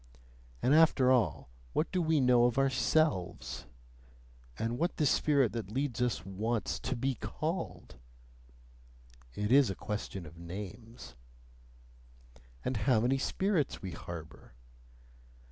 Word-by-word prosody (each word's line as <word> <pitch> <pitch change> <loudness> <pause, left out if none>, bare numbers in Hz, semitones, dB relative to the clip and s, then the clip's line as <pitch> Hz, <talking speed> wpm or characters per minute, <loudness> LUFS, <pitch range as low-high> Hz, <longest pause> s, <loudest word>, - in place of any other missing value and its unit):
And 130 - +4
after 150 -5 +5
all, 105 - +1 0.2
what 160 - 0
do 185 - +1
we 160 -2 +2
know 125 -2 +5
of 120 0 +1
ourselves? 95 - +1 0.9
And 115 +2 -2
what 170 - 0
the 150 - +2
spirit 140 -3 +3
that 115 -5 -5
leads 130 +1 -2
us 115 -10 0
wants 105 +3 -2
TO 130 - -3
BE 130 +3 0
CALLED? 155 - -4 1.4
(It 105 +2 -2
is 135 -2 +6
a 95 - -3
question 100 -3 -5
of 80 +2 -12
names.) 100 - -8 1.5
And 130 -2 -1
how 110 +2 +3
many 130 +3 +2
spirits 180 - 0
we 95 - -4
harbour? 80 -6 -9
120 Hz, 125 wpm, -32 LUFS, 95-135 Hz, 1.5 s, is